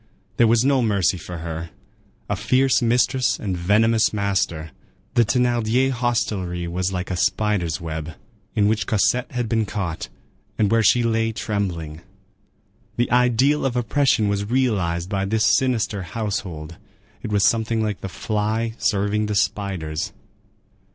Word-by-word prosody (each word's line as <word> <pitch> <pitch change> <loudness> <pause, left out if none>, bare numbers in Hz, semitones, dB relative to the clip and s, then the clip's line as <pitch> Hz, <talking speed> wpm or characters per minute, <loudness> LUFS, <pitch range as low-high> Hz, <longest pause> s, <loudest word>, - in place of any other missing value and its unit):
There 120 - +5
was 115 +2 +3
no 135 -2 +3
mercy 100 -5 +1
for 90 +1 -7
her; 80 0 -5 0.6
a - - -1
fierce 130 0 +2
mistress 125 +2 +2
and 95 -4 -3
venomous 110 +6 +3
master. 95 -6 -1 0.4
The 120 -2 +4
Thénardier 120 +2 +1
hostelry 105 -8 -1
was 90 +2 -2
like 90 0 -4
a - - -1
spider's 95 -3 0
web, 80 -1 -5 0.4
in 105 -2 +3
which 105 -3 0
Cosette 120 +4 +1
had 120 -2 -1
been 110 -1 0
caught, 85 -10 -4 0.5
and 105 -2 +2
where 115 0 +4
she 115 +4 +4
lay 115 -1 +1
trembling. 90 -8 -3 1.0
The 120 - 0
ideal 125 +4 +3
of 135 -2 -1
oppression 120 -3 +2
was 100 0 -1
realized 100 -10 0
by 95 -1 -1
this 110 +2 +1
sinister 115 -5 0
household. 90 -5 -4 0.4
It - - -5
was 100 -2 +3
something 110 0 +1
like 105 -3 -3
the 100 - -5
fly 110 +3 -2
serving 105 0 +1
the 105 - -2
spiders. 95 -6 -2
105 Hz, 145 wpm, -22 LUFS, 90-115 Hz, 1.0 s, There